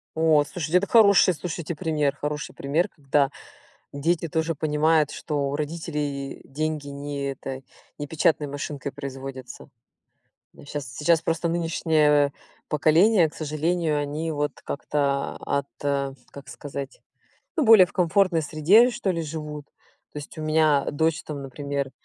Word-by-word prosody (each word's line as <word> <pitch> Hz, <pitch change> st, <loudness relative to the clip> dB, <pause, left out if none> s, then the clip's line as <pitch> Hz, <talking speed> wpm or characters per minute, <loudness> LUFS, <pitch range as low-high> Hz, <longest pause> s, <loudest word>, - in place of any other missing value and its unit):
О, 160 Hz, -2 st, +4 dB
слушайте, 170 Hz, +1 st, 0 dB
это 200 Hz, -, +1 dB
хороший, 200 Hz, -5 st, +6 dB
слушайте, 170 Hz, +1 st, -5 dB
пример, 150 Hz, -4 st, 0 dB
хороший 150 Hz, +1 st, -4 dB
пример, 150 Hz, +6 st, 0 dB
когда 140 Hz, -2 st, +1 dB, 0.6 s
дети 165 Hz, +4 st, 0 dB
тоже 160 Hz, 0 st, -1 dB
понимают, 155 Hz, 0 st, +2 dB
что 145 Hz, -3 st, -2 dB
у -, -, -4 dB
родителей 150 Hz, -3 st, -4 dB
деньги 155 Hz, 0 st, -3 dB
не 140 Hz, 0 st, -4 dB
эта 135 Hz, 0 st, -7 dB, 0.4 s
не 145 Hz, -, -5 dB
печатной 150 Hz, -1 st, +1 dB
машинкой 140 Hz, 0 st, -5 dB
производятся. 135 Hz, -2 st, -8 dB, 0.9 s
Да, -, -, -15 dB
щас 145 Hz, -2 st, -5 dB
сейчас 160 Hz, +3 st, +3 dB
просто 165 Hz, +1 st, -1 dB
нынешнее 155 Hz, -4 st, +2 dB, 0.4 s
поколение, 165 Hz, +5 st, +4 dB
к -, -, -18 dB
сожалению, 155 Hz, +1 st, -1 dB
они, 150 Hz, +3 st, -3 dB
вот, 145 Hz, -1 st, -1 dB
как-то, 140 Hz, -1 st, -1 dB
ат 140 Hz, 0 st, -1 dB, 0.6 s
как 140 Hz, -1 st, -11 dB
сказать, 135 Hz, +1 st, -7 dB, 0.6 s
ну, 310 Hz, -, +2 dB
более 220 Hz, -5 st, +8 dB
в -, -, -18 dB
комфортной 180 Hz, -1 st, +2 dB
среде, 170 Hz, -, +5 dB
что 235 Hz, -5 st, -2 dB
ли, 165 Hz, -2 st, -1 dB
живут. 150 Hz, -1 st, -6 dB, 0.5 s
То -, -, -6 dB
есть, 145 Hz, -, -10 dB
у 155 Hz, -, -5 dB
меня 155 Hz, -2 st, +3 dB
дочь, 160 Hz, +2 st, 0 dB
там, 150 Hz, -2 st, -6 dB
например, 140 Hz, 0 st, -4 dB
150 Hz, 140 wpm, -25 LUFS, 140-165 Hz, 0.9 s, более